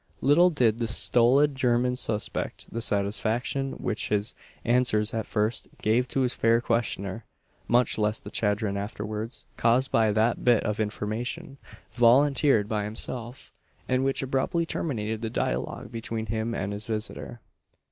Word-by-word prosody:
Little 165 +6 +5
did 120 -8 +2
the 115 - -1
stolid 125 +6 +4
German 125 -1 +1
suspect 110 -4 -3
the 115 - -3
satisfaction 115 +6 0
which 110 - -3
his 105 +1 0 0.3
answers 120 -3 +2
at 110 -1 -2
first 105 +1 -1
gave 120 +4 +2
to 135 - -1
his 125 -1 +1
fair 115 +1 +3
questioner; 115 -3 -2 0.4
much 120 -1 +2
less 105 +1 +1
the - - -11
chagrin 105 -1 0
afterwards 105 +3 -5
caused 120 +3 +2
by 110 -2 +3
that 110 +3 +1
bit 120 -3 +4
of 105 0 -2
information 120 +8 -4 0.3
volunteered 125 -1 +4
by 105 -1 -1
himself, 115 +3 -5 0.4
and 130 0 +1
which 135 0 +1
abruptly 135 +6 0
terminated 110 -10 -3
the 115 - -2
dialogue 115 - -3
between 115 -1 -4
him 110 +2 -2
and 100 +1 -3
his 105 +3 -6
visitor. 115 +2 -4
115 Hz, 145 wpm, -27 LUFS, 105-125 Hz, 0.4 s, Little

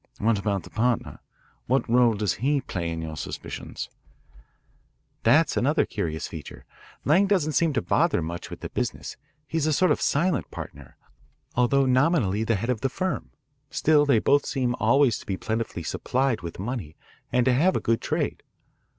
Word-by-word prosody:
"What 110 -1 +1
about 100 -2 -1
the - - -13
partner? 120 +1 0 0.5
What 130 +3 +1
role 120 -1 +4
does 105 -2 -1
he 140 +2 +2
play 85 -9 -4
in 80 0 -4
your 80 -1 -5
suspicions?" 70 - -6 1.3
"That's - - +4
another - - +2
curious 80 -2 -3
feature. - - -9 0.4
Lang 180 +7 +4
doesn't 180 -6 +2
seem 160 +3 +2
to 120 - 0
bother 85 - +2
much 85 +2 -5
with - - -9
the - - -5
business. - - -3 0.3
He 165 +3 -2
is 155 - +1
a 155 - +2
sort 185 +5 +3
of - - +1
silent 170 +5 +1
partner, 70 -3 -9 0.6
although 135 +3 +3
nominally 130 - +2
the 115 0 +1
head 115 +6 -1
of 115 -4 -3
the 135 - +1
firm. 185 +7 -3 0.4
Still, 150 -1 +3
they 140 - +5
both 140 +6 +3
seem 130 -4 0
always 135 -5 +3
to - - -13
be 95 - -2
plentifully 110 -6 -3
supplied 130 - 0
with 85 -2 -7
money 100 - -5 0.4
and 125 -1 +2
to 130 - +4
have 170 +9 +3
a - - +2
good 115 0 0
trade. - - -2
125 Hz, 175 wpm, -25 LUFS, 100-145 Hz, 1.3 s, they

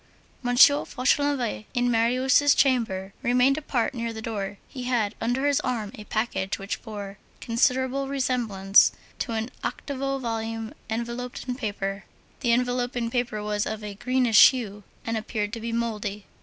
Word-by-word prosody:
M. 245 0 0
Fauchelevent 280 -3 +3
in 245 0 +2
Marius' 255 +5 +4
chamber, 215 -8 +1
remained 250 +3 +3
apart 260 -6 -1
near 230 -2 -3
the 220 - -7
door. 205 -3 -4
He 255 -2 -7
had 230 -4 0
under 245 +4 0
his 285 -1 +3
arm, 225 -5 -2
a 210 - -10
package 205 -4 -1
which 195 +1 -5
bore 205 -3 -7 0.2
considerable 260 +3 +1
resemblance 235 -8 +3 0.3
to 235 - -2
an 225 +2 -2
octavo 275 -1 -3
volume 225 -2 -4 0.2
enveloped 235 +3 -4
in 250 - -1
paper. 200 -5 -4 0.3
The 240 -3 +1
enveloping 245 -1 0
paper 240 -4 -1
was 210 0 -1
of 220 0 -4
a 210 -1 -5
greenish 245 +1 +6
hue, 215 -6 -5 0.2
and 230 0 -1
appeared 215 -1 -3
to 230 - -5
be 230 +1 -3
mouldy. 210 -3 -3
235 Hz, 150 wpm, -26 LUFS, 215-255 Hz, 0.3 s, greenish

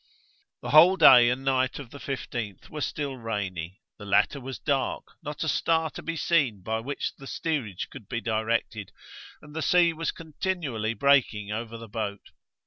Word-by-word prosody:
The - - -4
whole 170 +6 +8
day 120 -8 +8
and 130 +2 -2
night 130 -1 +1
of 135 -5 -9
the 140 - -10
15th 120 -8 -5
were 150 - -5
still 140 -3 -3
rainy; 95 -5 -4 0.2
the 105 - -9
latter 135 +7 +2
was 130 0 -6
dark, 140 -2 -1 0.2
not 150 +1 -5
a - - -2
star 160 0 +1
to - - -8
be 165 - -4
seen 145 - +1
by 110 +2 -1
which 140 +5 -4
the 135 - -11
steerage 135 - -3
could 105 - -12
be 115 - -2
directed, 110 -2 -2 0.5
and 150 0 -13
the 160 - -2
sea 170 0 +4
was 165 0 -3
continually 155 - -3
breaking 115 -5 +2
over 115 +1 -4
the 115 0 -10
boat. 105 -2 -5
130 Hz, 175 wpm, -27 LUFS, 110-150 Hz, 0.5 s, whole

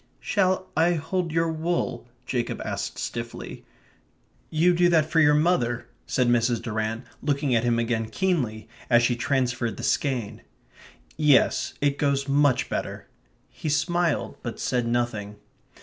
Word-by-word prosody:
"Shall 185 -2 +1
I 165 +2 +3
hold 170 +2 -2
your 165 +1 +1
wool?" 160 -7 -2 0.2
Jacob 120 -2 -2
asked - - -4
stiffly. 115 0 -6 0.8
"You 170 +3 +3
do 175 0 +4
that 160 -3 +3
for 165 - +3
your 150 -1 +5
mother," 150 -7 +1 0.2
said 125 -2 +1
Mrs. 120 -1 +2
Durrant, 110 +1 -3 0.2
looking 140 -2 0
at 115 -1 +2
him 120 -1 +2
again 115 -1 0
keenly, 125 - -1 0.2
as 120 -1 +5
she 120 0 +2
transferred 125 -2 -1
the - - -7
skein. 130 -7 -1 0.8
"Yes, 145 -4 +3
it 145 -1 +1
goes 140 -1 +1
much 140 -1 +3
better." - - -4 0.4
He 155 - -6
smiled; 170 +2 0
but 120 -2 -6
said 125 -2 0
nothing. 115 -4 -1
140 Hz, 140 wpm, -25 LUFS, 120-160 Hz, 0.8 s, your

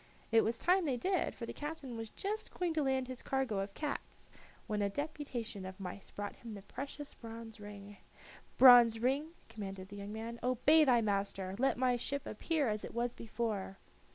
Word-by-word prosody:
It 225 0 +6
was 225 +1 0
time 365 +1 +3
they 265 -4 +1
did, 370 +9 0
for 235 - -5
the - - -6
captain 295 -4 -5
was 225 -1 -5
just 425 - -3
going 355 -2 -1
to 315 - +1
land 265 -2 +1
his 255 -1 -6
cargo 265 -7 0
of 195 0 -4
cats, 300 -2 -5 0.3
when 210 -1 -1
a 200 - +2
deputation 255 -5 -4
of 185 +1 -7
mice 190 +1 -7
brought 205 0 -5
him 230 -3 -8
the 200 - -9
precious 280 +6 -7
bronze 225 -1 -9
ring. 205 -1 -9 0.6
"Bronze 245 -3 +9
ring," 275 +7 0
commanded 195 -3 -7
the 205 - -8
young 200 +1 -6
man, 225 +2 -5
"obey 255 +6 +5
thy 245 -4 +5
master. 195 -2 -1
Let 270 +2 +3
my 250 -1 +3
ship 280 +3 -2
appear 295 +6 0
as 210 -1 -1
it - - -7
was 240 0 0
before." 215 -4 -3
235 Hz, 190 wpm, -34 LUFS, 205-275 Hz, 0.6 s, Bronze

